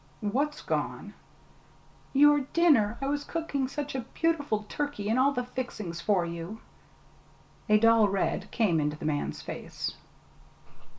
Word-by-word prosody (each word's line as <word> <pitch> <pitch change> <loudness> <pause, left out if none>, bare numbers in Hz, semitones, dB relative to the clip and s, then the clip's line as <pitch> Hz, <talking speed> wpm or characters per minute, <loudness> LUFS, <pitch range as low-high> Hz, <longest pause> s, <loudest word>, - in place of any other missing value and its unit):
"What's 275 +8 -1
gone?" - - -3 1.0
"Your 295 +1 +6
dinner 265 -11 +4
I - - +1
was 285 +1 -1
cooking 290 -5 -2
such 290 +2 -4
a 265 - -2 0.2
beautiful 290 -10 0
turkey 285 -9 -3
and 230 +3 +2
all 275 +2 +4
the 250 -3 -2
fixings 215 -9 -5
for 190 -2 +2
you." 170 +5 -6 1.1
A 215 - +7
dull 225 -1 +5
red 195 +1 -1
came 195 -9 +2
into 150 0 -1
the - - -7
man's 150 -1 -2
face. - - -5
230 Hz, 135 wpm, -28 LUFS, 200-285 Hz, 1.1 s, A